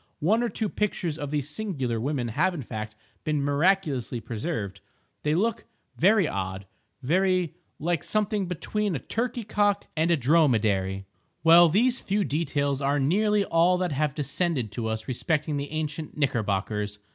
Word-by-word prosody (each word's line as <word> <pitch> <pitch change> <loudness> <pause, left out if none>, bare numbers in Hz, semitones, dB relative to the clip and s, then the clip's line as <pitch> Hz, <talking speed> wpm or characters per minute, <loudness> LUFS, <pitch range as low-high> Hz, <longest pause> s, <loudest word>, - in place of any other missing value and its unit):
One 210 +9 +2
or 240 - 0
two 220 - -2
pictures 180 -6 -2
of 145 - -4
these 145 -2 -1
singular 150 - -2
women 130 -2 -1
have 175 +10 +1
in 145 - -5
fact, 110 -1 -6 0.3
been 155 -1 0
miraculously 145 -4 +1
preserved. 110 - -4 0.4
They 150 +1 +1
look 225 +5 0 0.3
very 195 -1 +4
odd, 95 -2 -4 0.4
very—like 175 -1 0
something 210 -2 0
between 200 +2 -2
a - - -2
turkey 240 +1 -2
cock 205 -1 +1
and 160 +1 +1
a 170 - +4
dromedary. 110 - +2 0.4
Well, 170 +1 +8
these 240 +9 +2
few 205 +1 0
details 145 -3 -1
are 140 +1 +1
nearly 205 +8 +2
all 170 +2 +3
that 180 -2 -1
have 145 0 0
descended 140 - -1
to 110 +2 -3
us 110 0 -3
respecting 150 +3 -1
the 140 0 -4
ancient 155 0 -4
Knickerbockers. 105 -5 -1
155 Hz, 150 wpm, -26 LUFS, 125-185 Hz, 0.4 s, Well